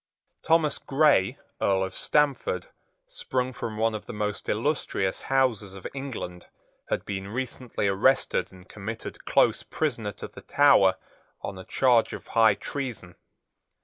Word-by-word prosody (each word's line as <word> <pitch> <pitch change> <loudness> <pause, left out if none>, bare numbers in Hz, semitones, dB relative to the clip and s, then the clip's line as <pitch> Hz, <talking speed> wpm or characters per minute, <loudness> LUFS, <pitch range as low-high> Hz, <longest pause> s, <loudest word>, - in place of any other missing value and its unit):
Thomas 160 -2 +2
Grey, 140 -9 +3 0.2
Earl 95 -1 +2
of 95 - -4
Stamford, 140 -11 +1 0.4
sprung 130 0 -2
from 110 -3 -5
one 115 +1 +2
of 105 - -6
the - - -6
most 105 -1 -3
illustrious 110 -5 0
houses 120 -8 +1
of 95 - -11
England, 125 -10 -6 0.4
had - - -1
been 95 -1 -4
recently 125 -1 -3
arrested 120 +8 +2
and 90 0 -15
committed 110 +3 -7
close - - +3
prisoner 115 -9 -2
to - - -8
the - - -13
Tower 140 -10 +5 0.5
on 95 -1 -5
a 95 - -9
charge 125 -4 +3
of - - -7
high 110 -3 +5
treason. 120 -11 -5
115 Hz, 140 wpm, -27 LUFS, 95-135 Hz, 0.5 s, Tower